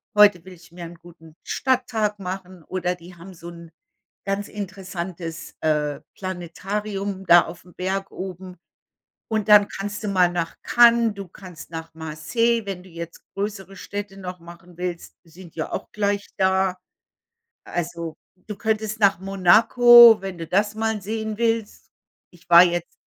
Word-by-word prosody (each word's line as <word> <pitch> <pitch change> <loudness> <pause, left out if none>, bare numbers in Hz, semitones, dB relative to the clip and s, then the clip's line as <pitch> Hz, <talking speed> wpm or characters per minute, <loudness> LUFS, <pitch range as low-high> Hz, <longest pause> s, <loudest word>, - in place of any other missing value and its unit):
Heute 205 -5 +6
will 190 - -11
ich 170 -1 -18
mir 175 0 -9
'n 170 +1 -10
guten 165 -2 -17
Stadttag 230 -5 -1
machen“, 185 -2 -7
oder 180 +1 -2
„die 175 +1 -14
haben 180 +3 -12
so 170 0 -10
'n 170 -1 -12 0.6
ganz 200 +1 -2
interessantes, 180 -4 -7
äh, 150 -2 0
Planetarium 195 +2 -5
da 175 -1 +8
aufm 175 +1 -12
Berg 195 +1 -3
oben.“ 185 -1 -8 0.7
Und 220 -1 -1
dann 210 -1 +7
kannst 205 +2 -6
du - - -1
mal 185 -3 +3
nach 170 -2 -3
Cannes, 235 -2 +5
du 200 -2 -8
kannst 180 -3 -12
nach 165 0 -7
Marseille, 160 +10 -1
wenn 190 -2 -5
du 190 - -16
jetzt 170 0 -8
größere 195 -1 -5
Städte 200 -1 -7
noch 180 -1 -7
machen 170 +1 -14
willst, 180 -1 -5
sind 170 0 -15
ja 160 - -4
auch - - -5
gleich 205 -1 -1
da. 190 -1 +1 0.9
Also, 170 -2 -4 0.3
du 210 - -5
könntest 220 0 -2
nach 200 -3 +4
Monaco, 225 +5 +7
wenn 190 -2 -6
du 165 - -6
das 205 +5 +1
mal 220 -1 -1
sehen 220 +1 -4
willst. 225 -2 -2 0.4
Ich 175 - -22
war 170 +1 +10
jetzt 175 -1 0
190 Hz, 155 wpm, -23 LUFS, 170-205 Hz, 0.9 s, war